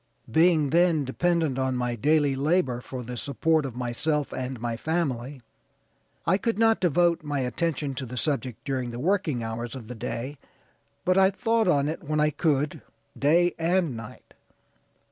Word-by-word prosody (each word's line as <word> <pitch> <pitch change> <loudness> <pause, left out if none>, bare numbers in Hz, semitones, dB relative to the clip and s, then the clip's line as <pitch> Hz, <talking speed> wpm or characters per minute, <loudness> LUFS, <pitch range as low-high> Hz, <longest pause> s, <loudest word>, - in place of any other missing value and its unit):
Being 160 -1 +4
then 170 -4 +3
dependent 160 -1 0
on 130 -1 0
my 125 -1 -1
daily 145 +3 +2
labor 140 -3 +1
for 125 0 -7
the 125 +1 -6
support 150 +4 +1
of 125 - -9
myself 135 +5 -1
and 130 -1 -4
my 120 0 -2
family 135 -3 -2 0.8
I 190 +3 +3
could 230 -1 -1
not 225 0 +4
devote 175 0 +2
my 145 -2 -2
attention 140 +3 -1
to 130 0 -5
the 125 +2 -7
subject 130 -4 -2
during 130 -3 -2
the 120 - -6
working 160 - 0
hours 115 +2 -4
of 120 -4 -8
the 125 - -6
day, 130 +4 -5 0.7
but 185 +1 +4
I 190 0 +6
thought 225 +1 +1
on 145 -5 +3
it 155 - -3
when 155 0 -1
I 150 0 +3
could, 145 -1 0 0.3
day 170 +5 +3
and 170 -4 +1
night. 115 -1 -10
145 Hz, 165 wpm, -26 LUFS, 125-170 Hz, 0.8 s, I